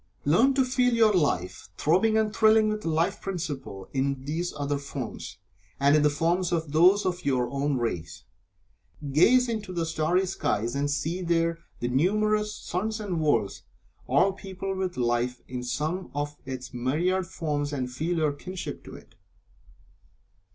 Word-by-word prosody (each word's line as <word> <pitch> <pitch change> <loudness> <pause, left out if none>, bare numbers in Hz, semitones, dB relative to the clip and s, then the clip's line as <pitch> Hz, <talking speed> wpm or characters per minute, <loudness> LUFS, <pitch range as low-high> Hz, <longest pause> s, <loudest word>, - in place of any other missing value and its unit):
Learn 235 - +4
to 265 -1 +3
feel 250 -1 +2
your 220 -2 +5
Life 140 - 0
throbbing 215 +8 +3
and 215 -1 0
thrilling 220 -1 +5
with 215 0 -2
the 165 - -2
Life 165 +5 0
Principle 145 - -5
in 135 0 -1
these 165 +4 -2
other 145 0 -1
forms, 140 -4 -6 0.4
and 140 +1 +5
in 155 - +4
the 150 - +4
forms 170 +4 0
of 165 -3 -1
those 180 +7 +5
of 180 -1 -2
your 130 -3 +1
own 140 0 0
race. 85 -8 -3 0.9
Gaze 250 - +5
into 220 -5 -3
the 170 -2 -1
starry 165 +3 +1
skies 120 - -1
and 145 +1 0
see 155 +5 -2
there 165 -1 +1 0.2
the 120 - 0
numerous 210 +10 +1
suns 215 +5 -3
and 185 -6 -2
worlds, 115 -10 +1 0.5
all 160 +10 +3
peopled 190 0 -5
with 185 -1 -2
life 120 0 0
in 125 -1 -5
some 155 +9 -3
of 145 0 -2
its 130 -1 -6
myriad 170 +10 0
forms, 145 -3 -2
and 130 -3 -3
feel 160 +7 -2
your 155 -2 +1
kinship 185 +5 -7
to - - -10
it. - - -15
160 Hz, 160 wpm, -27 LUFS, 140-190 Hz, 0.9 s, your